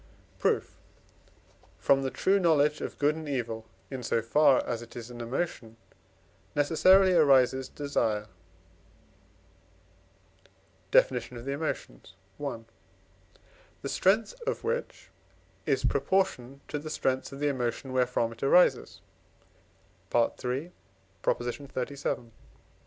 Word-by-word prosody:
Proof. - - 0 1.0
From 135 0 +3
the 135 - -1
true 195 +8 +2
knowledge 150 -4 +3
of - - -5
good 145 +1 +3
and 160 -2 -7
evil, 115 -4 -3 0.2
in 130 -2 -4
so 115 - 0
far 135 +3 +4
as 120 -1 -3
it 120 - -12
is 120 0 -8
an 120 -1 -8
emotion, 115 -2 -4 0.8
necessarily 185 +6 +5
arises 130 -5 +4
desire 115 -7 -1 2.6
(Def. - - +5 0.2
of 120 0 -8
the 140 - -2
Emotions, 140 - -5 0.3
i.), 130 -5 -3 1.2
the - - -3
strength 210 - +2
of 485 - -2
which 480 +2 -4 0.6
is - - +1
proportioned 140 -9 0
to 145 - -3
the 155 +2 -7
strength 130 -3 -1
of 135 - -8
the 145 0 +1
emotion 130 0 -3
wherefrom 125 -2 +1
it 115 - -13
arises 180 +6 +3 1.1
(III. 125 +6 0 0.5
xxxvii.). 130 -1 -3
135 Hz, 110 wpm, -29 LUFS, 120-150 Hz, 2.6 s, necessarily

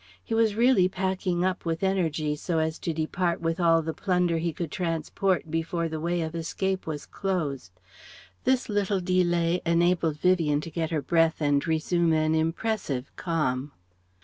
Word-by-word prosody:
He - - -5
was 225 -2 +3
really 230 -6 +4
packing 185 -1 -1
up 185 -1 -1
with 165 +1 -2
energy 160 -6 0
so 165 +3 -2
as 160 0 -1
to 170 - -2
depart 170 +2 -1
with 165 +1 -1
all 165 -2 +4
the 160 +1 -3
plunder 180 -3 +1
he 170 +1 -1
could 165 -1 -5
transport 170 0 -1
before 165 +1 -1
the 160 -1 -4
way 170 +2 -1
of 160 0 -5
escape 185 +3 -2
was 150 -2 -4
closed. 140 - -3 0.6
This 260 -1 +2
little 205 -2 0
delay 175 -1 +1
enabled 170 -2 +2
Vivien 165 -5 +2
to 165 - -8
get 160 0 -2
her 155 -4 -1
breath 165 +1 +2
and 145 0 +1
resume 165 +1 +1
an 155 0 +2
impressive 160 - -1
calm. 145 -5 -1
170 Hz, 165 wpm, -27 LUFS, 160-185 Hz, 0.6 s, really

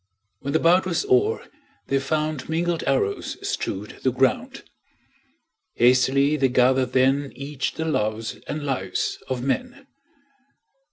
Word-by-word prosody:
When 140 - -4
the 160 - +3
bout 180 +3 +4
was 180 - 0
o'er 415 +3 +2 0.4
they 135 - +1
found 155 +1 -2
Mingled 170 +1 0
arrows 130 -8 0
strewed 105 +2 -4
the 130 - +2
ground. 130 +1 0 1.1
Hastily 130 +4 +4
they 135 -2 +2
gathered 130 +1 +3
then 135 +2 +2
Each 140 +1 -4
the 160 - -3
loves 110 -7 -1
and 150 -1 -4
lives 95 -10 -2
of 125 -2 -3
men. 250 - -2
140 Hz, 125 wpm, -24 LUFS, 130-160 Hz, 1.1 s, bout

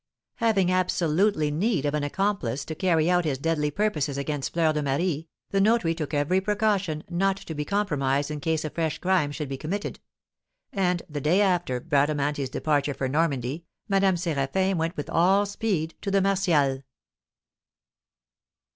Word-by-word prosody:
Having 205 -6 +2
absolutely 180 -2 +1
need 175 - 0
of 145 - 0
an 150 -1 0
accomplice 145 - -1
to 160 - -5
carry 165 -1 +2
out 180 0 +3
his 145 -5 -1
deadly 150 0 0
purposes 150 -6 -1
against 140 0 -3
Fleur 165 -2 +2
de 150 - -1
Marie, 150 +3 -1 0.2
the 195 - +2
notary 210 -5 +3
took 155 -3 -5
every 150 +6 +1
precaution 200 -6 0
not 190 +2 +1
to 170 - -7
be 150 -1 -3
compromised 145 -7 0
in 150 - -4
case 160 +1 -1
a 155 - -4
fresh 160 -2 -1
crime 180 -6 +1
should 150 0 -4
be 135 0 -4
committed; 195 +9 -4 0.7
and, 180 -3 0
the 145 -2 -5
day 165 +7 +3
after 175 -10 +1
Bradamanti's 145 0 0
departure 145 0 0
for 130 - -2
Normandy, 145 0 -1 0.2
Madame 195 -2 +3
Séraphin 170 +3 0
went 165 +2 -2
with 145 - -4
all 190 +4 +3
speed 200 -6 -2
to 200 - -3
the 195 0 +3
Martials. 170 -9 +2
165 Hz, 160 wpm, -26 LUFS, 145-190 Hz, 0.7 s, out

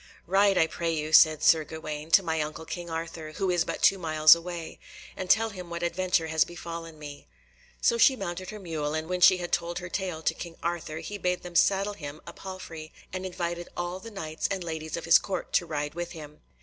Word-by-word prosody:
"Ride, 195 +1 +3
I 160 - +5
pray 165 +1 -2
you," 155 -1 -3
said 155 -2 +7
Sir 160 -1 +5
Gawaine, 155 0 -7
"to 195 +3 +6
my 160 -2 0
uncle 155 +1 -5
King 175 0 -6
Arthur, 165 -1 -5
who 190 +2 0
is 175 -2 +2
but - - -4
two 195 - +5
miles 155 -2 +7
away, 170 -1 -5 0.4
and 185 - -5
tell 225 +1 +4
him 180 -3 -9
what 170 0 -4
adventure 180 0 +1
has 160 0 +3
befallen 170 -1 -8
me." 145 - -10 0.5
So 235 - +3
she 265 - +6
mounted 185 -4 -5
her 215 - -7
mule, 160 -6 -3
and 160 0 -3
when 180 0 -2
she 185 +1 +8
had 175 -1 -5
told 170 0 -1
her 180 +1 -6
tale 180 -4 -3
to - - +2
King 170 -2 -8
Arthur, 170 -2 -3
he 200 +6 -6
bade 180 -1 -1
them 180 -1 -8
saddle 195 +4 +3
him 150 -5 -8
a - - -9
palfrey 165 -4 -8 0.2
and 185 0 -3
invited 175 -1 -4
all 175 +1 -3
the 230 - -9
Knights 160 -7 -3
and 190 -2 -2
ladies 160 -1 -4
of 170 - -6
his 165 0 +7
Court 195 - -5
to 175 - +2
ride 150 -2 -3
with 175 +1 -5
him. 150 -2 -11
170 Hz, 225 wpm, -28 LUFS, 160-185 Hz, 0.5 s, she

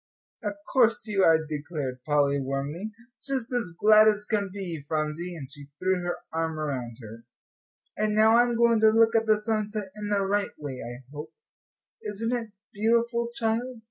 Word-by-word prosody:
"Of 205 -1 -2 0.2
course 230 -4 +4
you 205 -3 0
are," 160 -2 +4
declared 145 -4 -5
Polly, 145 -1 +2
warmly, 140 +9 -3 0.3
"just 265 -3 -3
as 230 -9 -2
glad 215 0 +7
as 210 -1 +2
can 205 -3 -1
be, 180 -6 -6
Phronsie," 155 +3 -2
and 145 -5 -7
she 145 -2 -10
threw 185 +1 0
her 175 0 -2 0.2
arm 160 -1 -2
around 130 -6 -4
her. 115 +2 -11 0.7
"And 215 0 0
now 220 +1 +6
I'm 240 0 +3
going 235 -1 +4
to 220 0 +6
look 225 +1 +4
at 225 0 +2
the 215 -1 +5
sunset 210 -2 -2
in 210 -1 -5
the 200 -1 +1
right 205 +1 -1
way, 140 -4 -6
I 120 +2 -8
hope. 150 +1 -7 0.7
Isn't 220 +3 -2
it 230 -2 -4 0.2
beautiful, 235 +2 +1
child?" 230 +2 -1
205 Hz, 175 wpm, -27 LUFS, 150-220 Hz, 0.7 s, glad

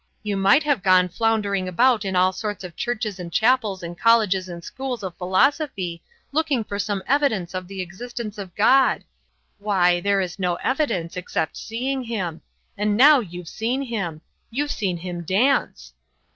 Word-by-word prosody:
You 205 -1 -2
might 195 +10 +4
have 290 -8 +1
gone 185 -1 +4
floundering 205 -2 0
about 235 +4 +3
in 190 -1 -2
all 185 +1 +3
sorts 205 +1 -4
of 175 -2 -8
churches 220 -5 -3
and 170 -1 -7
chapels 220 -5 +2
and 170 0 -6
colleges 200 -3 +3
and 170 -1 -8
schools 260 -1 -5
of 185 -2 -5
philosophy 185 - 0 0.3
looking 290 -5 +1
for 200 -1 -5
some 200 -1 -2
evidence 245 -11 +1
of 185 -1 -4
the 195 0 -5
existence 215 +3 -7
of 185 -4 -8
God. 260 +6 +4 0.6
Why, 180 -4 +2
there 200 +1 +2
is 185 0 -3
no 180 -2 0
evidence, 190 - -1
except 165 -3 -2
seeing 260 +4 -3
him. 185 -8 -4 0.3
And 210 0 0
now 285 +3 +8
you've 180 -6 -7
seen 245 +9 -2
him. 195 - -4 0.3
You've 290 +5 -2
seen 190 -5 -2
him 175 0 -6
dance!" 230 - +1
200 Hz, 165 wpm, -23 LUFS, 180-240 Hz, 0.6 s, now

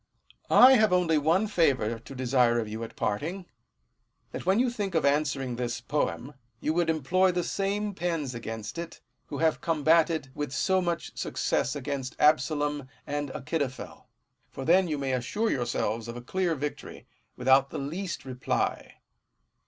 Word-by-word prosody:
I 260 +1 +8
have 215 -2 +3
only 175 -4 +3
one 165 +8 +2
favour 135 - +1
to 135 +4 -11
desire 125 -2 +2
of 115 -2 -1
you 110 +2 -5
at 115 - -8
parting, 170 - -2 0.9
that - - -7
when 190 +2 +4
you 245 +1 +2
think 205 -6 -3
of 160 - +2
answering 140 -4 0
this 120 -2 -2
poem, 130 - -2 0.3
you 155 - -1
would 170 0 +1
employ 180 +5 +2
the 175 0 -1
same 200 +3 -1
pens 165 -7 -2
against 115 +3 -6
it, 170 -1 -7 0.3
who 145 - -5
have 160 +1 +1
combated 160 -2 +2
with 145 -3 -4
so 190 +8 +2
much 175 -1 -3
success 140 - -1
against 140 -2 -4
Absalom 150 -2 +2 0.2
and 145 0 -3
Achitophel: 130 0 -4 0.4
for 135 - -7
then 180 +4 +4
you 155 -2 -2
may 135 -1 -2
assure 205 - -1
yourselves 120 -2 -1
of 115 +1 -6
a - - -7
clear 180 +4 0
victory, 145 +1 -6 0.3
without 135 +1 +4
the - - -6
least 170 +6 -4
reply. 130 -1 -2
150 Hz, 160 wpm, -28 LUFS, 130-175 Hz, 0.9 s, I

